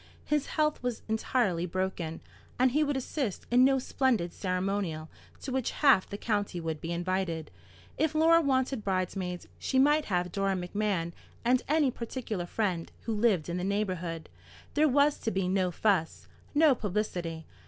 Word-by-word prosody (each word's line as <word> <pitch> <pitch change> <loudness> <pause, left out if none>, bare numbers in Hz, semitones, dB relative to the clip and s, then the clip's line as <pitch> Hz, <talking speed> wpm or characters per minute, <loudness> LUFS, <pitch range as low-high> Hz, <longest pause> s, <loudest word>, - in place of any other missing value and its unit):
His 300 -2 0
health 305 -1 +2
was 245 -2 -3
entirely 220 -5 0
broken, 180 -3 -3 0.4
and 255 0 +4
he 300 +4 +3
would 290 -2 0
assist 260 - -3
in 250 +1 +6
no 270 +1 +5
splendid 250 -9 0
ceremonial 185 -4 -2 0.3
to 270 - -5
which 260 -2 0
half 270 -10 +4
the 200 - -5
county 205 -5 -1
would 160 -2 -4
be 165 - -4
invited. 175 -2 -2 0.5
If 315 0 +1
Laura 330 +2 +6
wanted 260 -4 0
bridesmaids, 185 -2 -2
she 265 - -1
might 295 +3 +4
have 180 -2 -1
Dora 195 0 0
Macmahon 180 -2 -1 0.3
and 250 +1 +4
any 295 -3 +3
particular 230 -6 -4
friend 180 -5 -2
who 230 - -3
lived 210 -7 +2
in 175 +1 -2
the 180 - -3
neighbourhood. 185 -5 -2 0.5
There 305 +1 +4
was 285 +2 +3
to - - -1
be 190 -3 -1
no 185 -1 +1
fuss, 180 -2 0 0.3
no 300 -1 +6
publicity. 180 -7 -3
205 Hz, 160 wpm, -29 LUFS, 180-260 Hz, 0.5 s, in